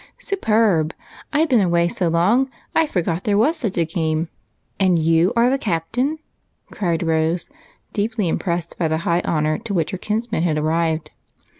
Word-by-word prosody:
"Superb! 215 - +1 0.4
I've 310 +3 +2
been 245 -6 +4
away 170 -2 +2
so 175 0 -1
long 200 +11 +3 0.2
I 325 -1 +3
forgot 175 - -1
there 205 -1 +1
was 290 +10 +3
such 225 - -3
a 170 - +3
game. 160 0 -1 0.5
And 185 -3 +4
you 165 +3 +3
the 250 +3 +3
captain?" 225 - -1 0.5
cried 170 -4 -1
Rose, 165 +1 0 0.4
deeply 215 -1 -1
impressed 170 0 -2
by 170 - +2
the 160 0 0
high 170 +1 +2
honor 155 -1 0
to 210 -4 -4
which 165 -3 0
her 190 - -4
kinsman 220 -2 -2
had 165 -3 +1
arrived. 160 0 0
175 Hz, 160 wpm, -21 LUFS, 165-220 Hz, 0.5 s, been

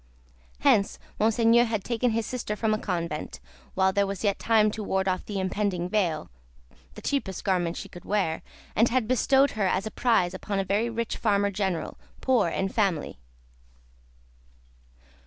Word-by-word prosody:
Hence 200 - +3 0.2
Monseigneur 230 +2 +4
had 220 -4 -2
taken 245 +2 0
his 225 0 -1
sister 240 -4 -3
from 215 0 0
a 215 - 0
convent, 170 -6 -3 0.4
while 190 0 +3
there 200 0 +2
was 195 +1 -5
yet 200 -2 +1
time 215 -2 +3
to 220 - -5
ward 190 -1 0
off 185 -1 0
the 205 -2 -3
impending 185 -2 -1
veil, 180 - -1 0.6
the - - -10
cheapest 215 -10 -2
garment 175 -3 0
she - - -6
could 175 - -12
wear, 195 -6 0 0.3
and 225 +3 +4
had 245 -2 +1
bestowed 265 +2 +3
her 210 -3 0
as 185 +2 0
a 220 - -4
prize 225 -8 +2
upon 205 -1 -4
a 195 - +1
very 205 +5 0
rich 230 0 -3
Farmer 200 -2 +1
General, 190 -5 -2 0.2
poor 245 -9 +2
in 190 +3 -1
family. 190 - -1
205 Hz, 165 wpm, -27 LUFS, 190-225 Hz, 0.6 s, Monseigneur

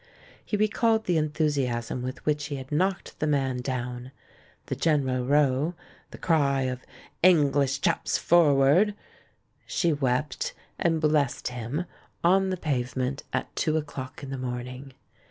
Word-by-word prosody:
He 210 - -2
recalled 220 +1 +2
the 175 -3 +2
en 155 0 0
thusiasm 130 -6 -1
with 130 +1 -6
which 150 -1 0
he 145 0 -4
had 130 0 -8
knocked 185 +4 -1
the 155 - 0
man 135 -3 +1
down; 125 0 -4 0.5
the - - -3
general 130 -6 +1
row 145 +3 +2 0.2
— - - -29
the - - -10
cry 140 -5 +2
of 130 -1 -3 0.4
"English 140 -6 +4
chaps - - +1
forward!" 165 +4 +4 0.7
She 170 -3 +1
wept, 135 0 -1 0.2
and 165 -2 +2
blessed 150 -5 +1
him, 125 +7 -4 0.4
on 190 +2 +4
the 185 - -1
pavement, 130 -3 -2
at - - -3
two 155 -1 +1
o'clock 145 -2 -6
in 135 - -6
the 135 - -4
morning. 125 +2 -6
140 Hz, 145 wpm, -27 LUFS, 130-160 Hz, 0.7 s, English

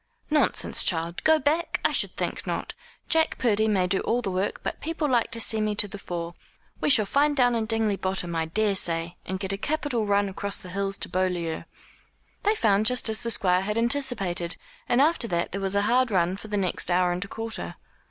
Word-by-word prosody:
"Nonsense, 295 -6 +1
child! 170 -1 0
Go 315 0 +5
back! 310 +4 0
I - - +4
should - - +4
think - - -4
not! - - -3 0.3
Jack 320 0 +1
Purdy 220 -3 +1
may 195 -4 +2
do 190 +2 +1
all 245 +2 -1
the 195 - -2
work, 185 +2 -2
but - - -4
people 325 -1 -2
like 240 -4 +1
to 230 - -6
see 220 -1 +1
me 215 -1 0
to 205 - +1
the 205 +1 -9
fore. 170 -2 -5 0.5
We - - 0
shall 220 -7 +5
find 290 +6 +1
down 245 -2 +4
in 225 -2 -1
Dingley 220 -3 0
Bottom, 185 -3 -1
I 165 0 0
daresay, 170 -3 -1
and 190 0 -3
get 195 0 -1
a 195 - -4
capital 290 -5 -1
run 200 0 +2
across 200 +1 -2
the 180 - -9
hills 195 +1 -2
to - - -2
Beaulieu." 180 -3 -2 0.8
They 420 +2 +2
found 215 - +2
just 250 -2 +3
as 220 0 +3
the 235 - +1
Squire 185 -4 +4
had 210 +3 -2
anticipated, 230 -9 0 0.3
and 240 +2 +4
after 300 -5 +3
that 170 -4 -1
there 195 - -4
was 195 0 -1
a 200 - +2
hard 250 +3 +2
run 180 -2 +1
for 205 - -10
the 210 -1 -2
next 185 -3 -1
hour 180 0 +2
and 175 +1 -2
a - - -9
quarter. 225 +2 -6
205 Hz, 220 wpm, -25 LUFS, 185-240 Hz, 0.8 s, Go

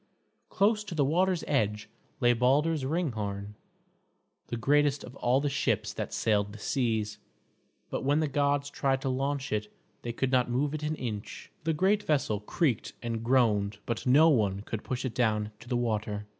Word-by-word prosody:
Close 210 +1 +2
to 180 - -7
the 145 -3 +3
water's 180 +4 +1
edge 105 -6 0 0.3
lay 120 0 +4
Balder's 140 +5 +2
Ringhorn, 110 - -2 0.9
the 120 - -3
greatest 145 +3 +2
of 125 - -10
all 125 +2 +2
the 145 - -1
ships 145 0 0
that - - -4
sailed 105 -2 +1
the - - -9
seas, 110 -3 -1 0.7
but - - -2
when 145 +3 +2
the 155 - +1
gods 145 0 0
tried 135 -1 0
to 135 - -1
launch 135 +1 -1
it 105 0 -2 0.3
they 120 - -4
could 130 +2 -1
not 125 -2 +3
move 140 +4 0
it 155 - -3
an 150 +1 -1
inch. 110 -7 -6
The 160 - +2
great 195 +6 +2
vessel 135 - 0
creaked 120 - -1
and 115 -1 -2
groaned, 110 -5 +2
but 115 -1 -3
no 145 +6 +7
one 100 -8 +2
could 110 0 -5
push 130 +1 -3
it 125 - -3
down 110 -3 +1
to 120 - -13
the 125 - +1
water. 105 -3 -2
130 Hz, 180 wpm, -29 LUFS, 110-145 Hz, 0.9 s, no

